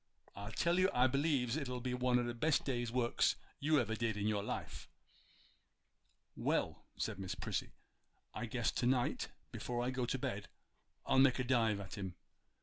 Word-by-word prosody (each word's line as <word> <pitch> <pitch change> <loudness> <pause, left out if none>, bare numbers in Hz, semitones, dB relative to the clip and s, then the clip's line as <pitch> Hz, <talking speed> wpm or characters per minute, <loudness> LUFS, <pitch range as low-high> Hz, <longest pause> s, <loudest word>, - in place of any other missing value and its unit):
I 100 +2 -6
tell 170 +10 +2
you 185 +1 +5
I 125 +1 +5
b'lieves 135 -2 +2
it'll 125 -5 -2
be 125 +1 -2
one 125 0 +2
o' 125 - +2
the 120 0 -2
best 150 +5 +2
day's 120 -4 -1
works 120 -1 +2 0.2
you 150 +1 +3
ever 110 -3 0
did 110 -2 -1
in 105 - -1
your 105 -1 +1
life.' - - -5 1.5
'Well,' - - -1
said - - -2
Miss 95 -2 -3
Prissy, - - -3 0.6
'I - - -3
guess - - 0
to 120 - 0
night 125 -1 +1 0.2
before 120 0 -2
I 125 - 0
go 125 -1 -1
to 135 - 0
bed 120 -7 -3 0.6
I'll 130 - +4
make 130 -1 +6
a 125 - 0
dive 115 -5 +2
at 100 0 -7
him. 95 -3 -4
125 Hz, 180 wpm, -36 LUFS, 115-130 Hz, 1.5 s, make